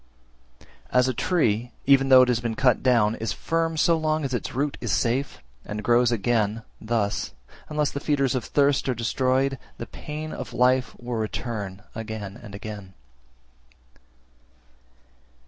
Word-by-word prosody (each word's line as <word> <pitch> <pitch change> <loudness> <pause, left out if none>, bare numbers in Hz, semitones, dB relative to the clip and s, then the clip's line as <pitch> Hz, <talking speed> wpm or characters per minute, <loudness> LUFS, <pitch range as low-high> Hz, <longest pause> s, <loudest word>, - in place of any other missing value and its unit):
338. - - 0
As 125 - +3
a 130 - 0
tree, 120 - +1
even 135 -1 +5
though 130 -1 +9
it - - +1
has 125 -2 +2
been 115 -1 -3
cut 125 -2 +3
down, 115 -4 +3
is 110 -2 -2
firm 165 +4 -1
so 165 +2 +4
long 155 -1 0
as 130 - -3
its 120 - -3
root 140 +2 0
is 120 - -2
safe, 125 +8 0 0.3
and 105 0 -5
grows 120 +2 +4
again, 115 -1 0 0.2
thus, 110 - -1 0.3
unless 150 -2 0
the 140 - -4
feeders 140 -3 +1
of 130 -3 -1
thirst 140 +1 +2
are 125 - +1
destroyed, 130 +3 0 0.2
the - - -5
pain 155 +1 -7
(of - - -7
life) 125 +2 +2
will 120 -1 -4
return 105 -3 -4
again 110 -3 -6
and 100 - -10
again. 100 -2 -8
125 Hz, 155 wpm, -25 LUFS, 110-135 Hz, 0.3 s, though